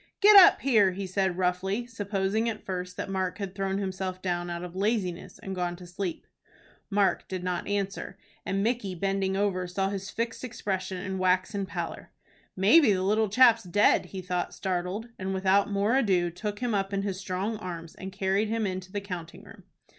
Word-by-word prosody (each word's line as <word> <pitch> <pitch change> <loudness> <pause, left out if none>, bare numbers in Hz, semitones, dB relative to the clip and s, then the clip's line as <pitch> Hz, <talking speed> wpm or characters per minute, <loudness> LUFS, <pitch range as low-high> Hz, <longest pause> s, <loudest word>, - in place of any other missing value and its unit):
"Get 420 0 +7
up 385 -3 +9
here!" 215 -8 +4
he 195 +1 -4
said, 190 -1 0
roughly, 190 +5 0
supposing 210 -1 -1
at 225 - -6
first 180 -1 -4
that - - -3
Mark 190 -2 -2
had 195 -3 -5
thrown 195 -1 -1
himself 190 -1 -3
down 175 -1 -2
out 170 0 -4
of 180 0 -8
laziness 190 -3 -1
and 195 - -6
gone 175 -1 -2
to 180 0 -11
sleep. 175 0 -5 0.6
Mark 200 -1 +1
didn't 180 -1 -3
answer, 200 -1 -3 0.3
and 195 +1 -1
Micky, 220 -5 -1
bending 195 +1 0
over, 190 -3 0
saw 190 +2 -1
his 195 0 -5
fixed 230 +1 -3
expression 200 -6 -3
and 190 +1 -4
waxen 185 +2 +1
pallor. - - -5 0.5
"Maybe 215 - +6
the 185 -1 -1
little 215 +2 +2
chap's 235 +1 +6
dead," 200 +2 +3
he 190 -1 -7
thought, 180 0 -2
startled, 190 +4 -3
and, 190 0 -2
without 195 +2 +3
more 205 +4 +1
ado, 185 -9 +2
took 205 +4 -4
him 245 -2 0
up 195 -1 0
in 195 0 0
his 195 -2 -3
strong 195 +3 -2
arms 170 -4 -7
and 190 0 -8
carried 195 +3 0
him 225 0 -1
into 185 -1 -4
the 205 - -3
counting 180 -4 -7
room. - - -15
195 Hz, 185 wpm, -28 LUFS, 185-205 Hz, 0.6 s, up